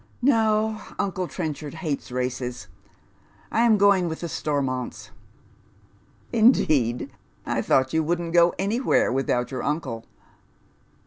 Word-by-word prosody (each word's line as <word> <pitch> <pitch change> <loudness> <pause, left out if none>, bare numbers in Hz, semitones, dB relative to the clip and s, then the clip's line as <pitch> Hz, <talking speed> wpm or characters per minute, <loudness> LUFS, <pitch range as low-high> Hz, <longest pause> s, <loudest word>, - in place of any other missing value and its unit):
" - - -33
No, 220 -4 +2 0.2
uncle 185 -2 -2
Trenchard 155 -4 -5
hates 155 -6 -4
races. 125 -4 -3 0.8
I - - 0
am 230 -2 +5
going 200 -3 +4
with 160 - -6
the 170 - -3
Stor 150 -1 -1
monts." 130 -2 -5 0.6
" - - -32 0.5
Indeed! 155 - +3 0.3
I - - -1
thought 130 0 +2
you 160 - +3
wouldn't 170 +1 -2
go 170 0 +5
anywhere 215 - +1
without 125 -1 0
your 130 -2 -3
uncle." 135 -7 -3
160 Hz, 130 wpm, -24 LUFS, 130-200 Hz, 0.8 s, am